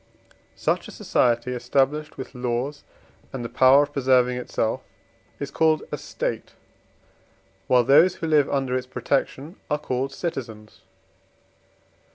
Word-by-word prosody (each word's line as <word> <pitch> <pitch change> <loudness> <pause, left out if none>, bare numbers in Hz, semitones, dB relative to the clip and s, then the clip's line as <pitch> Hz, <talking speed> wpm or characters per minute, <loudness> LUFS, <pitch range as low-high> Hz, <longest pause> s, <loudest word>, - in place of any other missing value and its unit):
Such - - -1
a - - -9
society 120 0 +1
established 135 +5 0
with 130 - -8
laws 125 +3 -3 0.5
and 125 -3 -5
the - - -5
power 130 +2 +6
of 145 0 -7
preserving 125 -2 +3
itself 120 -2 -2 0.6
is - - -5
called 160 -1 +2
a - - -2
State, - - -4 1.1
while 125 -1 +4
those 160 +9 +5
who 165 - -5
live 150 -3 +3
under 135 -2 -1
its 130 0 -3
protection 140 +5 -2
are 150 - +1
called 135 -2 -3
citizens. 115 -11 -6
130 Hz, 130 wpm, -24 LUFS, 125-145 Hz, 1.1 s, power